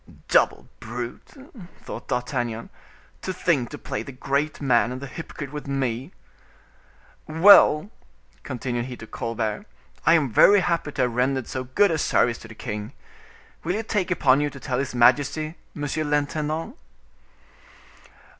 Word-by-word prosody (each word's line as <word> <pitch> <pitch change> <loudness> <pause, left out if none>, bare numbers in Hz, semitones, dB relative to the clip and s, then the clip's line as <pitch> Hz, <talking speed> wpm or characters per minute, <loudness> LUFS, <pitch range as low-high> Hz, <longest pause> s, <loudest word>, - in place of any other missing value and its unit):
"Double - - +3
brute!" 120 +1 -7 0.5
thought - - -8
D'Artagnan, 120 -2 -3 0.5
"to 190 - -3
think 150 -9 0
to - - -7
play 105 - -4
the 125 - -8
great 140 +3 -2
man 125 -4 +2
and 130 - -5
the 140 - -7
hypocrite 140 0 -8
with 150 -1 -7
me. 135 +1 -2 1.2
Well," 165 +2 +6 0.5
continued 120 -2 -3
he 125 -1 -7
to - - -9
Colbert, 115 - -3 0.4
"I 165 - +6
am 145 -7 +1
very 205 - +7
happy 170 -4 -1
to 130 - +1
have 125 -2 0
rendered 130 +1 0
so 130 -1 -5
good 175 +10 +3
a 160 - 0
service 120 -4 +2
to - - -11
the 110 - -12
king; 105 -2 -6 0.7
will 175 +3 -1
you 220 - -2
take 210 -5 -1
upon 140 -6 +3
you 145 - 0
to 140 - -11
tell 130 -2 -2
his 130 -2 -3
majesty, 145 +5 +3 0.2
monsieur 145 +1 -2
l'intendant?" 155 - -1
140 Hz, 150 wpm, -24 LUFS, 125-155 Hz, 1.2 s, very